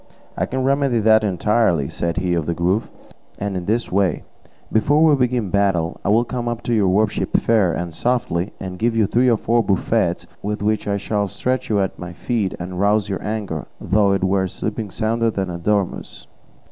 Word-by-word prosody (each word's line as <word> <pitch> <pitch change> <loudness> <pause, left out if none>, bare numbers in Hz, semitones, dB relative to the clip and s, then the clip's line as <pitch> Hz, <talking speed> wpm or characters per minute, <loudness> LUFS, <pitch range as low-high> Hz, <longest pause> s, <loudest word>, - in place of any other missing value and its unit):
"I - - -1
can 130 0 -2
remedy 135 -3 +2
that 110 0 +4
entirely," 100 -6 +1
said 85 +4 -3
he 90 -1 0
of 85 -3 -1
the 85 - -1
Grove, 90 +6 0 0.5
"and 100 -1 -3
in 90 -1 -3
this 115 +4 -1
way: 95 -3 +1 0.5
before 145 +8 +3
we 160 -2 +6
begin 125 -4 +1
the 95 - -7
battle, 95 -5 +1
I - - 0
will 110 +3 +4
come 120 -1 -4
up 120 -1 -3
to 120 - -1
your 105 -4 +3
worship 105 +3 +1
fair 110 -6 +2
and 85 0 -4
softly, 110 -4 -1
and 90 -2 -6
give 115 0 +1
you 110 -2 +3
three 125 +5 +2
or 115 - +3
four 115 +2 +2
buffets, 95 -4 0 0.2
with 105 +1 -3
which 105 0 0
I 100 0 0
shall 100 0 -1
stretch 130 +6 -2
you 105 -2 +2
at 95 - -3
my 90 0 -7
feet 105 0 -2
and 90 +1 -5
rouse 105 +1 +2
your 95 -3 -3
anger, 105 -7 -4
though 100 +1 +2
it 95 -1 -1
were 95 0 +2
sleeping 105 +3 -4
sounder 115 +4 0
than 95 -4 -3
a 85 - -5
dormouse." 100 +1 -2
105 Hz, 205 wpm, -20 LUFS, 95-115 Hz, 0.5 s, we